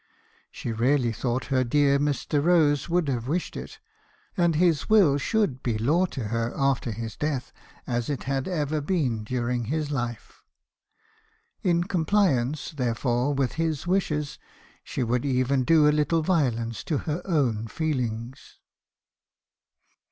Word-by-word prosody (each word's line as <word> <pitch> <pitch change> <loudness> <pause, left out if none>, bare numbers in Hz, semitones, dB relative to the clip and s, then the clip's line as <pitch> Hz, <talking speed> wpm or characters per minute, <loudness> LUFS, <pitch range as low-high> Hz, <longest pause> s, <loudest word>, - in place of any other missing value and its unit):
She 120 - -5
really 120 +2 +2
thought 120 +3 -2
her 130 -1 +3
dear 140 +2 +3
Mr. 145 0 0
Rose 155 -4 +3
would 170 -2 +1
have 125 -3 -2
wished 170 +5 -2
it; - - -7 0.6
and 170 -4 +2
his 165 -4 +2
will 185 -10 +5
should 175 - 0
be 115 -3 -1
law 155 +12 +2
to 120 -10 -5
her 115 +1 -1
after 135 -4 +1
his 110 0 -6
death, 140 -4 -3 0.3
as 120 0 -2
it 145 - -3
had 135 0 -2
ever 155 -4 -1
been 140 - -1
during 120 +1 -2
his 150 +4 -2
life. 120 -4 -4 1.2
In 175 -4 +2
compliance, 160 -7 +1
therefore, 125 0 0
with 135 -2 0
his 160 -3 -1
wishes, 150 -6 -1 0.4
she - - -3
would 120 +1 0
even 130 -1 +1
do 155 +2 +5
a - - +5
little 150 +2 +1
violence 120 - 0
to 155 - 0
her 155 +2 -2
own 125 - 0
feelings. 125 -4 -4
140 Hz, 140 wpm, -26 LUFS, 120-160 Hz, 1.2 s, will